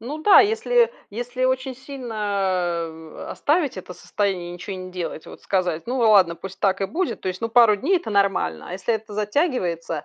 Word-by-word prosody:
Ну 275 +7 -6
да, 410 +6 +7
если 460 +3 +2 0.2
если 245 +4 -3
очень 260 0 0
сильно, 200 -10 -2
э, 160 0 -10
оставить 300 - 0
это 180 0 -9
состояние 190 -4 -2
и - - -7
ничего 185 +2 -6
не 185 0 -8
делать, 175 -3 -5
вот - - -11
сказать: 180 -3 -1
"Ну 255 +2 -2
ладно, 200 -7 +5
пусть 190 +2 -9
так 195 0 +1
и - - +2
будет", 360 - -2
то 185 - -2
есть, 185 +3 -4
ну, 230 - -1
2 230 -2 +6
дней- 310 - +2
это 345 - -4
нормально. 195 - 0
А - - -7
если 190 +5 -1
это 215 -1 -6
затягивается, 205 - -1
205 Hz, 195 wpm, -23 LUFS, 180-260 Hz, 0.2 s, да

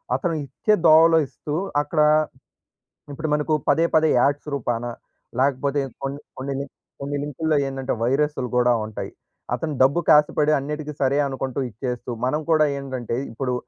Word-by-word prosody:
అతను 175 -4 -1
ఇచ్చే 215 +9 0
దోవలో 165 +1 +7
ఇస్తూ, 145 +3 -6 0.3
అక్కడ 155 +1 0 1.1
ఇప్పుడు 155 +3 -4
మనకు 150 +1 0
పదే, 165 - +4
పదే 160 0 +5
యాడ్స్ 140 +3 +1
రూపాన 120 -3 -2 0.6
లేకపోతే 140 +1 +1 0.2
కొన్ 135 0 -3 0.2
కొన్ని, 135 +1 -3 0.3
కొన్ని 140 +1 -3
లింకుల్లో 150 +2 -1
ఏందంటే, 135 -1 -3
వైరసులు 135 +1 0
గూడా 125 0 +4
ఉంటయి. 100 -2 -6 0.4
అతను 150 +5 -3
డబ్బుకి 140 +6 +3
ఆశపడి, 150 0 +1
అన్నిటికి 150 +2 -5
సరే 135 +1 +2
అనుకుంటూ 135 0 -3
ఇచ్చేస్తూ, 125 +2 -5
మనం 150 +5 0
కూడా 155 -1 +5
ఏంటంటే, 130 -4 -4 0.2
ఇప్పుడు 125 +2 -2
140 Hz, 135 wpm, -23 LUFS, 130-150 Hz, 1.1 s, దోవలో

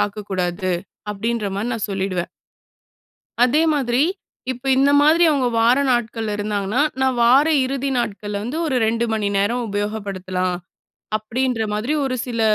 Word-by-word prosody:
பார்க்கக்கூடாது 185 -3 -2 0.4
அப்படின்ற 225 +1 -2
மாரி 220 +4 -2
நா - - -3
சொல்லிடுவேன். 190 -2 -2 1.2
அதே 290 +6 +3
மாதிரி 255 -2 +1 0.5
இப்ப 250 +1 -13
இந்த 275 +1 +4
மாதிரி 320 +4 +5
அவங்க 265 -4 +1
வார 240 +3 +4
நாட்கள்ல 225 -2 -1
இருந்தாங்கன்னா, 205 +3 -1 0.2
நான் 260 -1 +2
வார 260 +5 +6 0.2
இறுதி 275 +1 -2
நாட்கள்ல 205 -3 -3
வந்து 250 +7 -4
ஒரு 270 -4 0
2 230 +1 +1
மணி 215 -2 0
நேரம் 235 +5 +1
உபயோகப்படுத்தலாம் 195 -3 -2 0.6
அப்டின்ற 230 +2 -1
மாதிரி 215 +8 -1
ஒரு 265 -1 -1
சில 235 -2 -3
225 Hz, 135 wpm, -21 LUFS, 200-255 Hz, 1.2 s, வார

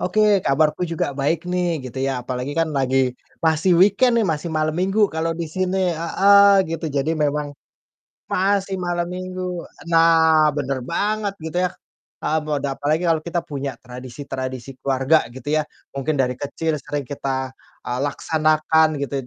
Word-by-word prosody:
Oke, 185 +4 0 0.2
kabarku 150 +4 +2
juga 165 - 0
baik 160 +4 0
nih 180 -1 +1 0.2
gitu 130 +1 -7
ya, - - 0
apalagi 130 +3 -4
kan 165 - +1
lagi 130 0 +1 0.5
masih 160 +3 +3
weekend 210 +6 +5
nih, - - +2
masih 155 +2 -4
malam 155 0 +1
minggu 195 +3 +1
kalau 165 +1 0
disini 185 +3 -2 0.2
heeh, 200 +3 +5
gitu. 165 0 -3
Jadi 140 +4 +1
memang 150 -1 -1 0.8
masih 195 0 +1
malam 175 -1 -1
minggu 185 -1 -5 0.3
nah, 160 -2 +5
bener 135 -2 -1
banget 205 +2 -1
gitu 160 +2 -4
ya 180 - +1 0.5
heeh, 160 - +1
boda 145 -2 -1
apalagi 155 +4 0
kalau 165 -1 +3
kita 170 +1 -1
punya 140 -1 -4
tradisi-tradisi 130 +1 -7
keluarga 135 +3 +3 0.2
gitu 130 - -11
ya, 155 - +1 0.3
mungkin 140 +3 -1
dari 125 -1 +1
kecil 155 +4 -2
sering 145 -3 -4
kita, 130 -1 -3 0.4
eee, 125 0 -2
laksanakan 155 +1 +2
gitu 140 0 -3
155 Hz, 150 wpm, -21 LUFS, 140-180 Hz, 0.8 s, weekend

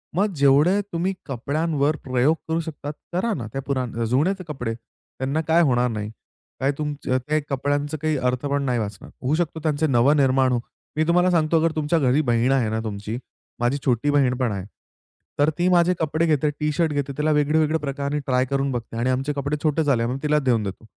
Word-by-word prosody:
मग 195 +1 +1
जेवढे 145 +7 +4
तुम्ही 180 +3 0
कपड्यांवर 145 +3 0
प्रयोग 130 +5 +2
करू 160 +1 0
शकता, 145 -2 -6 0.2
करा 210 +6 0
ना. 115 -6 -4
त्या 135 - -2
पुरान 125 -4 -2
जुने 140 - +2
ते 185 - -6
कपडे. 125 -6 -3
त्यांना 130 +5 -5
काय 165 +2 +5
होणार 125 -4 +2
नाही. 105 -1 -4 0.5
काय 135 +2 +2
तुमच्या 145 -4 -2
त्या 155 +1 +2
कपड्यांचं 145 +2 -1
काही 155 -1 +1
अर्थ 125 +1 -1
पण 140 0 0
नाही 125 -3 0
वाचणार. 105 -2 -6
होऊ 140 +5 +1
शकतो 165 -1 -1
त्यांचे 155 0 +1
नव 130 +1 +4
निर्माण 135 -3 +3
हो. 120 - +1 0.4
मी 155 - +2
तुम्हाला 180 +1 +3
सांगतो 165 0 +3
तुमच्या 155 +2 +1
घरी 135 +2 +3
बहीण 120 +2 +2
आहे 125 -5 +2
ना 110 - -1
तुमची, 105 +1 -4 0.4
माझी 120 +4 +1
छोटी 125 +2 +1
बहीण 135 -3 +3
पण 125 -4 0
आहे. 95 -2 -4 0.7
तर 145 +2 +4
ती 175 - +2
माझे 175 0 +4
कपडे 160 +1 +1
घेते, 150 -1 +2
टी 150 0 0
शर्ट 160 +1 +1
घेते 140 -1 -2
त्याला 155 +1 +1
वेगळे 150 +1 +2
वेगळे 155 +1 +2
प्रकाराने 140 0 -2
ट्राय 130 0 +2
करून 140 +1 -1
बघते 115 -2 -5
आणि 125 +2 0
आमचे 135 +3 0
कपडे 145 +1 -2
छोटे 155 0 +2
झाले 125 -5 +2
मी 125 - -2
तिला 150 0 +3
देऊन 125 -6 +1
देतो, 100 +2 -6
140 Hz, 205 wpm, -23 LUFS, 125-155 Hz, 0.7 s, काय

